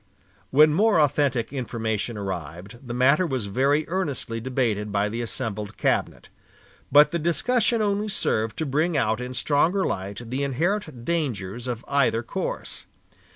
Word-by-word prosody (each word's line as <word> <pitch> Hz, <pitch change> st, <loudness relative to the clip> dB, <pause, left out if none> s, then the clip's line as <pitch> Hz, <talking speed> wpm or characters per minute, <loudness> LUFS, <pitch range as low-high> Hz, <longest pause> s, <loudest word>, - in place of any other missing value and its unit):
When 150 Hz, +4 st, +6 dB
more 205 Hz, +1 st, +4 dB
authentic 140 Hz, -4 st, +1 dB
information 115 Hz, -3 st, -3 dB
arrived, 95 Hz, +2 st, -6 dB
the 125 Hz, -3 st, -8 dB
matter 140 Hz, +8 st, +4 dB
was 130 Hz, -7 st, -2 dB
very 140 Hz, +9 st, +1 dB
earnestly 145 Hz, -10 st, -3 dB
debated 115 Hz, -5 st, -1 dB
by 100 Hz, +1 st, +1 dB
the 115 Hz, +3 st, -3 dB
assembled 110 Hz, -3 st, -4 dB
cabinet; -, -, -1 dB, 0.6 s
but 145 Hz, +2 st, +7 dB
the 170 Hz, -, -1 dB
discussion 220 Hz, -, +1 dB
only 205 Hz, +1 st, 0 dB
served 110 Hz, -, 0 dB
to 160 Hz, -, -1 dB
bring 155 Hz, +4 st, +1 dB
out 110 Hz, +1 st, +1 dB
in 125 Hz, +1 st, -5 dB
stronger 165 Hz, +9 st, +2 dB
light 100 Hz, +5 st, -4 dB
the 130 Hz, +2 st, -1 dB
inherent 155 Hz, -, -2 dB
dangers 120 Hz, -, -2 dB
of 120 Hz, -2 st, -4 dB
either 135 Hz, -5 st, +2 dB
course. -, -, -5 dB
130 Hz, 145 wpm, -25 LUFS, 110-155 Hz, 0.6 s, but